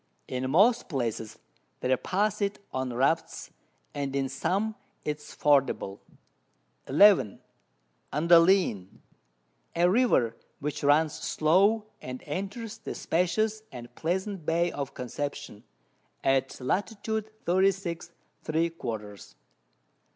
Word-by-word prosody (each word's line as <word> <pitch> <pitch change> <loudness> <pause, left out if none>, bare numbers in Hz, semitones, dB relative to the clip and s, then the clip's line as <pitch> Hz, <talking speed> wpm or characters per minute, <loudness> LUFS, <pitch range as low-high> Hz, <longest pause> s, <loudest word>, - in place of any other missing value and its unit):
In 130 0 -3
most 205 - +4
Places 115 - -3 0.4
they 130 +1 +2
pass 205 - -1
it 200 0 0 0.2
on 130 -1 -2
Rafts, 135 +7 0 0.4
and 140 -1 -3
in 135 -1 0
some 195 +11 -1 0.3
it 150 -1 -1
is 150 - -14
fordable. 135 -9 +2 0.9
11. 170 - +5 0.7
Andalien, 165 - +4 0.9
a 170 +1 +4
River 180 - +3 0.2
which 145 0 -4
runs 150 +2 +4
slow, 195 +8 +2 0.2
and 130 0 -7
enters 200 +8 -5
the - - -6
spacious 215 +6 0
and 120 -2 -10
pleasant 190 +2 -2
Bay 170 +2 +1
of 140 -1 -5
Conception, 140 -2 -5 0.6
at 135 0 +1
Lat. 180 +10 0 0.6
36 185 -2 +1 0.3
three 165 +2 0
quarters. 110 -9 -7
155 Hz, 105 wpm, -28 LUFS, 130-190 Hz, 0.9 s, 11